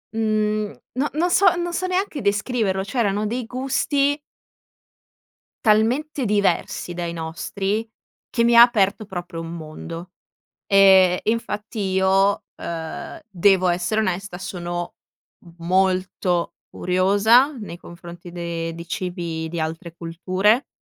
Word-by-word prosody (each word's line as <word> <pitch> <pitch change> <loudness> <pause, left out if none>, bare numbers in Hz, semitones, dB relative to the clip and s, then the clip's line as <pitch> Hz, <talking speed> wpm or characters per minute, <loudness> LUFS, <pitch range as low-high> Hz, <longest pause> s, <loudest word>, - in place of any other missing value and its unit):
mhmm, 215 -1 0 0.2
no 285 +3 +1
non 345 +4 +1
so 365 0 +5
non 345 0 -2
so 370 +1 -1
neanche 365 -6 -1
descriverlo. 205 -1 0
C'erano 210 -1 0
dei 240 +1 -3
gusti 275 +3 0 1.5
talmente 245 +6 +2
diversi 200 -3 0
dai 170 -1 -4
nostri 195 +7 -3 0.4
che 235 - +1
mi 235 0 +4
ha 235 - +9
aperto 215 -3 +4
proprio 175 -3 -6
un 165 0 -6
mondo, 165 +2 -8 0.6
ehm, 190 -2 +6
e - - +2
infatti 215 -1 -4
io, 190 +1 +2
uhm, 165 - -6
devo 190 -1 +3
essere 180 +5 +1
onesta, 190 -2 -2
sono 175 -2 -5 0.6
molto 185 0 0 0.2
curiosa 205 +9 +3
nei 195 -6 -8
confronti 175 0 -11
de 170 -1 -4
di 170 - -8
cibi 170 -2 -4
di 170 - -5
altre 160 +1 -4
culture, 185 +8 0
195 Hz, 120 wpm, -22 LUFS, 175-225 Hz, 1.5 s, ha